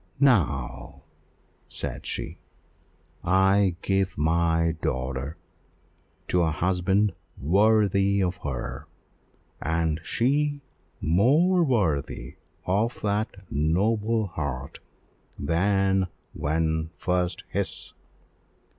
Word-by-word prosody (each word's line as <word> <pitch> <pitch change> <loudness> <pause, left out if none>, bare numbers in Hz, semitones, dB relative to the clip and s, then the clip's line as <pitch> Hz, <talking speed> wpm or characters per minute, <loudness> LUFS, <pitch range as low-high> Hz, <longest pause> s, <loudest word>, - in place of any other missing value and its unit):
"Now," 70 - +1 0.7
said - - -5
she, - - -4 0.8
"I 95 +1 +3
give 95 -1 0
my 80 +1 +2
daughter 65 +4 -2 0.9
to 90 - +3
a 80 - +2
husband 95 +4 +1 0.3
worthy 100 +2 +3
of 90 0 -1
her, 70 -7 -5 0.7
and 80 0 0
she 145 - +1 0.4
more 150 - +4
worthy 80 - -1 0.3
of 105 +6 0
that 105 -1 -1
noble 105 +9 +1
heart 70 -7 -5 0.6
than 95 +4 +2 0.3
when 80 +1 0
first 90 -1 -1
his. - - -4
90 Hz, 80 wpm, -26 LUFS, 80-105 Hz, 0.9 s, more